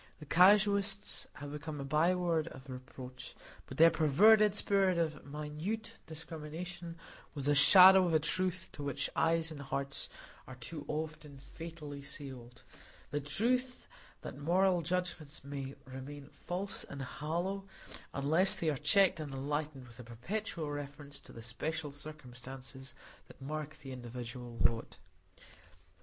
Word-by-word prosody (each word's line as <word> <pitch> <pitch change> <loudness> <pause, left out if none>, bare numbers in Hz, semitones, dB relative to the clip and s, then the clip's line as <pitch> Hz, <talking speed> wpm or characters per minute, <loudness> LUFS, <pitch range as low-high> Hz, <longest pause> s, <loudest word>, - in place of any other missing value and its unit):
The 150 - -9
casuists 200 +4 +4
have 145 -1 -8
become 150 0 -5
a - - -3
byword 165 +2 +2
of 130 -3 -10
reproach; 130 0 -9 0.3
but 130 - -8
their 165 +1 +8
perverted 205 +8 +6
spirit 195 -3 +3
of 155 -3 -1
minute 150 +10 -4
discrimination 165 +2 -7 0.4
was 140 -2 -4
the 145 - +4
shadow 185 +6 +9
of 170 - 0
a - - +6
truth 185 +3 0
to - - -9
which 140 0 -2
eyes 165 0 +2
and 145 -2 -7
hearts 140 0 -3 0.4
are 130 - -8
too 145 +4 -7
often 155 -2 -4
fatally 150 0 -8
sealed,—the 130 +1 -8
truth, 250 - 0 0.3
that - - -7
moral 180 +4 +3
judgments 165 -4 -3
must 140 -1 -5
remain 135 +2 -8
false 190 +3 -4
and 140 -1 -7
hollow, 175 +8 -3 0.5
unless 160 +7 +3
they 160 -2 0
are 145 - -2
checked 170 +5 +4
and 150 -2 -5
enlightened 145 0 -3
by 120 - -14
a - - -7
perpetual 155 - -4
reference 145 0 -6
to - - -15
the 115 - -10
special 150 +6 -3
circumstances 130 -2 -10 0.3
that - - -16
mark 155 +2 -5
the 135 - -9
individual 120 -1 -7
lot. 115 -1 +1
150 Hz, 135 wpm, -34 LUFS, 140-175 Hz, 0.5 s, shadow